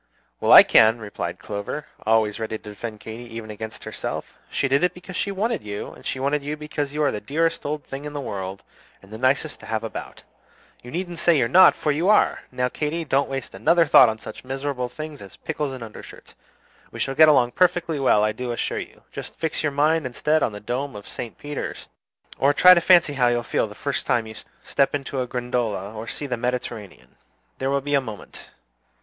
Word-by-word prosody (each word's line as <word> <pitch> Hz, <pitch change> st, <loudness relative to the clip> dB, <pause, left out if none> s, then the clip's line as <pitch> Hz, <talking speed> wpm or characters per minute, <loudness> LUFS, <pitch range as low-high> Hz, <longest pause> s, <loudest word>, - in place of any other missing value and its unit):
"Well, -, -, +2 dB
I -, -, +12 dB
can," 110 Hz, +1 st, +5 dB
replied 95 Hz, -5 st, -5 dB
Clover, 100 Hz, +10 st, -5 dB, 0.2 s
always 110 Hz, -1 st, +2 dB
ready 110 Hz, 0 st, -3 dB
to 105 Hz, -, -12 dB
defend 110 Hz, +1 st, -7 dB
Katy 115 Hz, +2 st, -8 dB
even 110 Hz, -1 st, -6 dB
against 110 Hz, +1 st, -7 dB
herself. -, -, -6 dB
"She 135 Hz, -, 0 dB
did 140 Hz, +4 st, +2 dB
it 180 Hz, 0 st, +1 dB
because 180 Hz, +1 st, -10 dB
she 200 Hz, -, -1 dB
wanted 215 Hz, +3 st, -1 dB
you, 105 Hz, -1 st, -6 dB
and -, -, -15 dB
she 130 Hz, -, -3 dB
wanted 140 Hz, +2 st, 0 dB
you 150 Hz, +2 st, -4 dB
because 150 Hz, -2 st, -4 dB
you 150 Hz, +1 st, -1 dB
are 145 Hz, -, +3 dB
the 105 Hz, -, -4 dB
dearest 165 Hz, +7 st, -1 dB
old 150 Hz, 0 st, -3 dB
thing 135 Hz, +2 st, -7 dB
in 150 Hz, -, -6 dB
the 145 Hz, -, -4 dB
world, 100 Hz, -6 st, -5 dB, 0.4 s
and 100 Hz, +2 st, -14 dB
the 110 Hz, -, -7 dB
nicest 135 Hz, +4 st, +1 dB
to -, -, -12 dB
have 110 Hz, 0 st, -2 dB
about. 115 Hz, -, -7 dB, 0.6 s
You 120 Hz, -, -11 dB
needn't 175 Hz, +2 st, -4 dB
say 170 Hz, -2 st, +4 dB
you're 125 Hz, -4 st, +2 dB
not, 185 Hz, +10 st, +7 dB
for 150 Hz, -, 0 dB
you 165 Hz, +7 st, +1 dB
are! 215 Hz, -, +4 dB
Now, 125 Hz, 0 st, 0 dB
Katy, 155 Hz, +5 st, -3 dB
don't 140 Hz, -1 st, +1 dB
waste 135 Hz, -1 st, -5 dB
another 170 Hz, +2 st, +3 dB
thought 130 Hz, -4 st, +7 dB
on 110 Hz, -, -3 dB
such -, -, -10 dB
miserable 135 Hz, -1 st, -3 dB
things 155 Hz, +1 st, -8 dB
as 100 Hz, -1 st, -11 dB
pickles 150 Hz, -3 st, -3 dB
and 130 Hz, -3 st, -7 dB
undershirts. 110 Hz, -2 st, -12 dB, 0.6 s
We -, -, -9 dB
shall 135 Hz, -, -1 dB
get 155 Hz, +2 st, +7 dB
along 125 Hz, -5 st, +4 dB
perfectly 175 Hz, -3 st, +1 dB
well, 115 Hz, -6 st, +4 dB
I 110 Hz, -, +2 dB
do 120 Hz, +3 st, -4 dB
assure 120 Hz, -, -2 dB
you. -, -, -10 dB
Just -, -, -8 dB
fix 160 Hz, -2 st, -2 dB
your 155 Hz, -, 0 dB
mind 150 Hz, +1 st, +2 dB
instead 150 Hz, +5 st, +1 dB
on -, -, +1 dB
the 105 Hz, -, -8 dB
dome 125 Hz, +4 st, -4 dB
of 100 Hz, -, -9 dB
St. 120 Hz, -, -6 dB
Peter's, 145 Hz, 0 st, -6 dB, 0.5 s
or 145 Hz, +2 st, +3 dB
try 180 Hz, 0 st, +9 dB
to 175 Hz, -, +3 dB
fancy 170 Hz, -5 st, +5 dB
how 125 Hz, -3 st, +2 dB
you'll 120 Hz, 0 st, +1 dB
feel 115 Hz, -, 0 dB
the 105 Hz, -, -12 dB
first 140 Hz, -4 st, -3 dB
time 120 Hz, -2 st, +2 dB
you 110 Hz, -, -9 dB, 0.3 s
step 140 Hz, +1 st, +1 dB
into 135 Hz, -1 st, -3 dB
a 125 Hz, -, -3 dB
gondola 120 Hz, -5 st, -2 dB
or 110 Hz, +1 st, -7 dB
see 145 Hz, -, -5 dB
the 125 Hz, -3 st, -2 dB
Mediterranean. 120 Hz, -5 st, -5 dB, 0.4 s
There 135 Hz, -, -1 dB
will 140 Hz, 0 st, +1 dB
be 145 Hz, +1 st, -3 dB
a 140 Hz, -, +4 dB
moment! 110 Hz, -6 st, -10 dB
135 Hz, 220 wpm, -23 LUFS, 110-150 Hz, 0.6 s, I